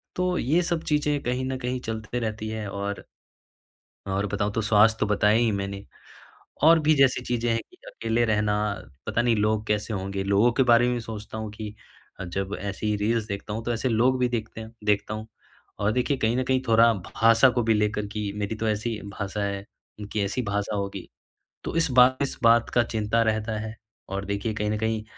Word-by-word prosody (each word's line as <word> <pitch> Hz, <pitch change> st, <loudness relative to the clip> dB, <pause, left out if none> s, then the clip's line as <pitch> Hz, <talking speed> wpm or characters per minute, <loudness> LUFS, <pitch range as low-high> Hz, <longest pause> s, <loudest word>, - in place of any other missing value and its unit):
तो 180 Hz, 0 st, 0 dB
ये 160 Hz, +8 st, +2 dB
सब 170 Hz, -1 st, -1 dB
चीज़ें 150 Hz, -1 st, +1 dB
कहीं 125 Hz, +2 st, -1 dB
न 130 Hz, 0 st, -2 dB
कहीं 125 Hz, 0 st, -2 dB
चलते 110 Hz, +1 st, -4 dB
रहती 110 Hz, -1 st, -3 dB
है 110 Hz, -2 st, -4 dB
और 100 Hz, +1 st, -4 dB, 1.1 s
और 100 Hz, +1 st, 0 dB
बताऊँ 105 Hz, +1 st, -1 dB
तो 115 Hz, -, 0 dB
स्वास्थ्य 110 Hz, +1 st, +4 dB
तो -, -, +2 dB
बताया 105 Hz, +1 st, +3 dB
ही 115 Hz, -1 st, +2 dB
मैंने। 100 Hz, 0 st, -4 dB, 0.8 s
और 160 Hz, +1 st, +7 dB
भी 155 Hz, 0 st, +3 dB
जैसी 135 Hz, -3 st, +4 dB
चीज़ें 120 Hz, -1 st, -1 dB
हैं 115 Hz, -, +1 dB
कि -, -, -21 dB
अकेले 115 Hz, +1 st, -1 dB
रहना 105 Hz, -1 st, +1 dB, 0.5 s
पता 110 Hz, +2 st, 0 dB
नहीं 120 Hz, -1 st, +2 dB
लोग 105 Hz, 0 st, +1 dB
कैसे 105 Hz, +1 st, -1 dB
होंगे? 95 Hz, 0 st, -3 dB
लोगों 100 Hz, +5 st, +3 dB
के 130 Hz, +3 st, +2 dB
बारे 120 Hz, 0 st, +5 dB
में 125 Hz, -1 st, -1 dB
सोचता 110 Hz, -1 st, -7 dB
हूँ 110 Hz, -1 st, -5 dB
कि 105 Hz, 0 st, -7 dB, 0.4 s
अ, -, -, -4 dB
जब 95 Hz, +3 st, -3 dB
ऐसी 100 Hz, +2 st, -2 dB
रील्स 110 Hz, +2 st, 0 dB
देखता 100 Hz, 0 st, -5 dB
हूँ 110 Hz, +2 st, -4 dB
तो 120 Hz, +1 st, -1 dB
ऐसे 120 Hz, +3 st, -1 dB
लोग 125 Hz, +3 st, +2 dB
भी 125 Hz, -, +3 dB
देखते 110 Hz, -1 st, -4 dB
हैं 110 Hz, -, -9 dB
देखता 105 Hz, 0 st, +1 dB
हूँ 110 Hz, +1 st, -6 dB, 0.5 s
और 105 Hz, +1 st, +2 dB
देखिए 130 Hz, +2 st, 0 dB
कहीं 115 Hz, +2 st, +1 dB
न 130 Hz, -, +1 dB
कहीं 130 Hz, 0 st, +1 dB
थोड़ा 115 Hz, +1 st, +6 dB
भाषा 115 Hz, +6 st, +4 dB
को 120 Hz, -, +3 dB
भी 115 Hz, 0 st, +3 dB
लेकर 105 Hz, 0 st, 0 dB
की 105 Hz, -2 st, -3 dB
मेरी 105 Hz, +2 st, -2 dB
तो 110 Hz, 0 st, -2 dB
ऐसी 110 Hz, +2 st, -1 dB
भाषा 100 Hz, 0 st, -4 dB
है 100 Hz, 0 st, -3 dB, 0.3 s
उनकी 105 Hz, +1 st, -4 dB
ऐसी 100 Hz, +6 st, -1 dB
भाषा 105 Hz, 0 st, -2 dB
होगी। 100 Hz, -1 st, -4 dB, 0.6 s
तो -, -, -4 dB
इस 165 Hz, -3 st, +2 dB
बार 125 Hz, +1 st, +6 dB
इस 140 Hz, -, -2 dB
बात 115 Hz, 0 st, +5 dB
का 120 Hz, -, +5 dB
चिंता 110 Hz, 0 st, 0 dB
रहता 110 Hz, 0 st, 0 dB
है 110 Hz, +1 st, -5 dB, 0.3 s
और 100 Hz, +1 st, -3 dB
देखिए 100 Hz, +2 st, -2 dB
कहीं 105 Hz, 0 st, -1 dB
न 105 Hz, -, -1 dB
कहीं, 110 Hz, 0 st, -1 dB
110 Hz, 205 wpm, -25 LUFS, 105-120 Hz, 1.1 s, और